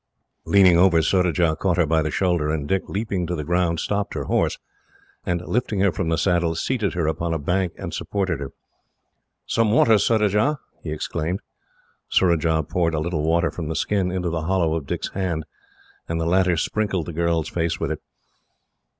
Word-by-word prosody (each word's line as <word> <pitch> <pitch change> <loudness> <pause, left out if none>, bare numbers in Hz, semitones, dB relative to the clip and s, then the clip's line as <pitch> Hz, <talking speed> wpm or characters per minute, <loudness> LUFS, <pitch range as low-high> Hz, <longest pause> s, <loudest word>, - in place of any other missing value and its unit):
Leaning 95 -4 +5
over, 90 -2 +5
Surajah 85 -1 +2
caught 90 -3 +1
her 90 - +4
by 80 +1 +2
the 75 - -1
shoulder; 85 -2 0
and 75 -2 -2
Dick, 95 +4 +1
leaping 100 -4 -2
to 90 - -2
the 75 - -4
ground, 85 +1 0
stopped 100 +3 -2
her - - -2
horse, - - 0 0.7
and, 85 0 -1
lifting 110 -4 -1
her 100 -1 +4
from 85 -2 -2
the 80 - +1
saddle, 85 -3 +1
seated 105 0 -1
her 85 -2 0
upon 80 +1 -1
a - - +1
bank 90 +4 -1
and - - -6
supported 95 -6 -2
her. 70 -1 -6 0.9
"Some 115 -2 +1
water, 110 -1 +5
Surajah!" 105 +6 +2 0.2
he 80 - -6
exclaimed. 80 +3 -3 0.7
Surajah 80 -3 +2
poured 85 -3 0
a - - 0
little 80 0 -2
water 80 +1 +1
from 80 -3 -5
the 80 - -3
skin 95 -1 0
into 90 -2 -2
the 80 -1 -2
hollow 90 -4 +1
of 75 -4 -4
Dick's - - -3
hand, 90 -5 -2 0.7
and 80 0 -1
the 80 - -1
latter 90 0 +2
sprinkled 95 -1 -1
the 85 - -6
girl's 85 -1 0
face 85 -1 -1
with 80 -2 -2
it. 80 - -4
85 Hz, 185 wpm, -23 LUFS, 80-95 Hz, 0.9 s, Leaning